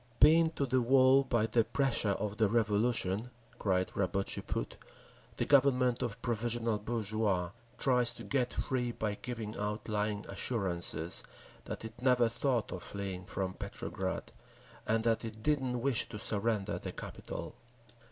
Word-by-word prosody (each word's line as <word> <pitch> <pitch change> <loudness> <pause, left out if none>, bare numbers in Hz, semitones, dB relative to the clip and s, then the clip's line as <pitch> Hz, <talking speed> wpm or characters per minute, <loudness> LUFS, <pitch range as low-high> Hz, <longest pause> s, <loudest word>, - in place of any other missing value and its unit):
Pinned 160 +2 +6
to 140 - 0
the 130 -1 +2
wall 130 +2 +5
by 120 -4 +1
the 115 0 +2
pressure 115 -6 +1
of 105 +2 -4
the 110 - +4
Revolution 110 -1 +1 0.3
(cried 95 -2 0
Rabotchi 100 0 -1
Put), - - -4 0.6
the - - 0
Government 130 -3 +4
of 120 -1 -3
"provisional" 115 -1 +1
bourgeois 105 -5 -1 0.3
tries 125 -2 +3
to - - -10
get 130 -3 0
free 125 -2 -1
by 110 -3 -2
giving 110 -1 -6
out 105 +1 -3
lying 105 -1 -1
assurances 90 -7 -1 0.4
that - - -6
it 110 +1 -10
never 125 -2 +4
thought 120 0 0
of - - -5
fleeing 95 -2 -4
from 95 0 -3
Petrograd, - - -5 0.6
and 110 0 +2
that 115 0 +1
it 110 -1 -7
didn't 130 -4 0
wish 135 -2 +5
to 105 - -6
surrender 105 -1 -1
the - - -5
capital…. - - -7
115 Hz, 145 wpm, -32 LUFS, 105-125 Hz, 0.6 s, Pinned